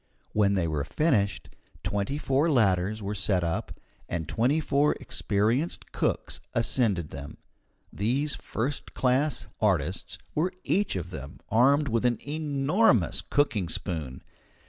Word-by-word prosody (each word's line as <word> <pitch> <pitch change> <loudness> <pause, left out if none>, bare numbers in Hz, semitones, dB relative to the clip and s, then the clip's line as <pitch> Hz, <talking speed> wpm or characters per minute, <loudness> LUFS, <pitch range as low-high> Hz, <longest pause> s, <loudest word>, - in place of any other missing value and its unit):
When 100 -2 +3
they 90 -3 +1
were 75 -3 -1
finished, 105 - +1 0.4
twenty 105 +8 -1
four 145 +2 +2
ladders 105 - +2
were 100 +1 -2
set 95 -3 0
up, 85 -1 -3 0.3
and 80 -3 -3
twenty 130 +7 +2
four 145 -1 +2
experienced 110 +10 -1
cooks - - -1
ascended 110 - +1
them. 70 +1 -8 0.6
These 130 +8 0
first 135 +5 -4
class 135 +3 +1
artists - - 0 0.2
were 170 +5 0
each 205 - +1
of 90 -1 -4
them 70 -3 -8
armed 140 +6 +4
with 115 -2 +1
an 120 -2 +3
enormous 145 - +2
cooking 105 - +1
spoon. 80 -6 -3
115 Hz, 125 wpm, -28 LUFS, 95-140 Hz, 0.6 s, armed